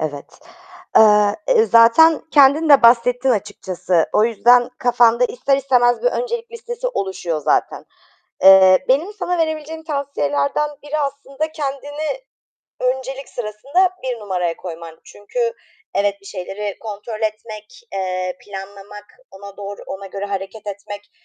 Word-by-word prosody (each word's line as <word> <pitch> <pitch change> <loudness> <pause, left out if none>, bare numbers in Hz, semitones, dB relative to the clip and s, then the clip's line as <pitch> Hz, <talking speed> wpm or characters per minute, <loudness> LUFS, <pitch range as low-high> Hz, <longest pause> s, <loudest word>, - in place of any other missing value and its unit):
Evet, 145 -2 -6 0.6
eee, 210 -1 +5
eee, 475 -3 +4
zaten 280 - +6
kendin 290 +3 +5
de 285 -2 +6
bahsettin 245 +2 +4
açıkçası. 185 -5 -1
O 210 - +3
yüzden 240 +2 +4
kafanda 240 0 +3
ister 255 +3 0
istemez 250 -3 +2
bir - - +3
öncelik 475 -2 -4
listesi 480 +1 -5
oluşuyor, 185 - -3
zaten. - - 0 0.6
Eee, 190 +2 +7
benim 300 +10 +1
sana 360 -3 -3
verebileceğim 315 0 -3
tavsiyelerden 280 - -1
biri 295 +1 -4
aslında 285 +2 -4
kendini 290 - -5 0.6
öncelik 265 +1 -3
sırasında 260 - -1
1 250 -2 -3
numaraya 180 -5 -2
koyman. 165 -2 -9
Çünkü, 470 - -4 0.4
evet, 200 0 0
bir 195 - -17
şeyleri 200 +1 -6
kontrol 215 0 -7
etmek, 215 - -6
eee, 185 -1 -3
planlamak, 200 +1 -10 0.3
ona 200 +1 -12
doğru, 200 0 -8
ona 195 +1 -7
göre 195 +1 -6
hareket 200 +2 -6
etmek, 205 0 -8
230 Hz, 125 wpm, -19 LUFS, 200-285 Hz, 0.6 s, Eee